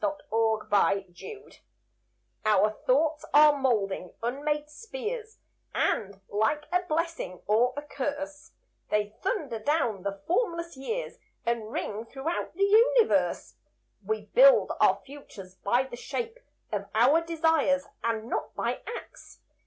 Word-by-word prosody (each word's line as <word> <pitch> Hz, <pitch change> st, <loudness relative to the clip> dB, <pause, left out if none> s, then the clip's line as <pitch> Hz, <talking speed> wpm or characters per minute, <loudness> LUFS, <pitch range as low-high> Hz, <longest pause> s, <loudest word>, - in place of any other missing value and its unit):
=The -, -, +4 dB, 0.2 s
Creed 205 Hz, -4 st, +1 dB
To 415 Hz, -, -9 dB
Be= -, -, -19 dB, 0.8 s
Our 215 Hz, -1 st, +4 dB, 0.2 s
thoughts 300 Hz, +4 st, +2 dB
are 300 Hz, 0 st, +8 dB
molding 210 Hz, -9 st, -1 dB
unmade 295 Hz, +5 st, -1 dB
spheres, 455 Hz, +5 st, -6 dB, 0.4 s
And, 195 Hz, -2 st, 0 dB
like 220 Hz, +9 st, 0 dB
a 360 Hz, 0 st, +3 dB
blessing 330 Hz, -, -3 dB
or 240 Hz, +5 st, +2 dB
a 290 Hz, -, -3 dB
curse, 290 Hz, +2 st, -5 dB, 0.4 s
They 210 Hz, 0 st, 0 dB
thunder 310 Hz, -, -2 dB
down 230 Hz, -, 0 dB
the 200 Hz, 0 st, -5 dB
formless 340 Hz, -4 st, -1 dB
years, 450 Hz, -, -4 dB, 0.3 s
And 230 Hz, -2 st, -1 dB
ring 220 Hz, +1 st, -4 dB
throughout 305 Hz, +9 st, -4 dB
the 395 Hz, -, +1 dB
universe. 450 Hz, +3 st, +3 dB, 0.5 s
We 435 Hz, 0 st, -2 dB
build -, -, +6 dB
our -, -, +5 dB
futures, 235 Hz, -10 st, -11 dB
by 240 Hz, +6 st, +2 dB
the 265 Hz, -2 st, -9 dB
shape 465 Hz, -, -4 dB, 0.3 s
Of 200 Hz, -2 st, -3 dB
our 265 Hz, +9 st, +5 dB
desires, 320 Hz, -4 st, +2 dB, 0.2 s
and 225 Hz, -1 st, -1 dB
not -, -, -3 dB
by -, -, -2 dB
acts. 475 Hz, -, -9 dB
285 Hz, 130 wpm, -28 LUFS, 220-335 Hz, 0.8 s, are